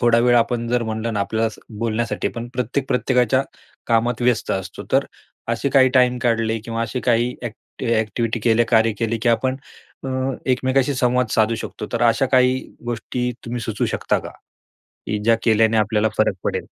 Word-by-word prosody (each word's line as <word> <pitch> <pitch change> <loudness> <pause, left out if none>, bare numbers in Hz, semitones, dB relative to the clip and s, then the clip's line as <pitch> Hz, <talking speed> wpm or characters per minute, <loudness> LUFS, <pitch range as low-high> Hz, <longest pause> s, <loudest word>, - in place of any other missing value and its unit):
थोडा 120 -1 +4
वेळ 120 0 +4
आपण 120 0 +1
जर 120 0 +1
म्हटलं 110 +1 -3
ना 105 - -1
आपल्याला 110 +2 0 0.3
बोलण्यासाठी 115 +1 -1
पण 120 0 -7
प्रत्येक, 125 +2 -1
प्रत्येकाच्या 125 +1 +2 0.5
कामात 115 +1 +1
व्यस्त 120 -1 +1
असतो. 95 -2 -5
तर - - +4 0.4
असे 115 +4 0
काही 130 -1 +5
टाईम 125 -1 +4
काढले 115 -1 +1
किंवा 115 0 -3
असे 125 +2 -3
काही 120 +1 +1
ऍक्ट 115 -2 -9
एक्टिव्हिटी 115 0 0
केले, 115 +1 +3
कार्य 115 -1 +3
केले, 115 0 -1
की 125 - +2
आपण 130 +3 +1 0.5
अ, - - -3 0.4
एकमेकांशी 130 +1 +1
संवाद 125 0 +2
साधू 110 +1 +2
शकतो. 105 - -6
तर 120 0 -1
अशा 120 +3 +3
काही 130 0 +4 0.3
गोष्टी 125 +1 -2 0.2
तुम्ही 120 +1 -3
सुचवू 110 -2 -2
शकता - - 0
का? - - -8 0.8
की 105 - -1
ज्या 115 +1 +4
केल्याने 110 0 +3
आपल्याला 110 0 +2
फरक 110 - +3
पडेल? - - -2
115 Hz, 170 wpm, -21 LUFS, 110-125 Hz, 0.8 s, काही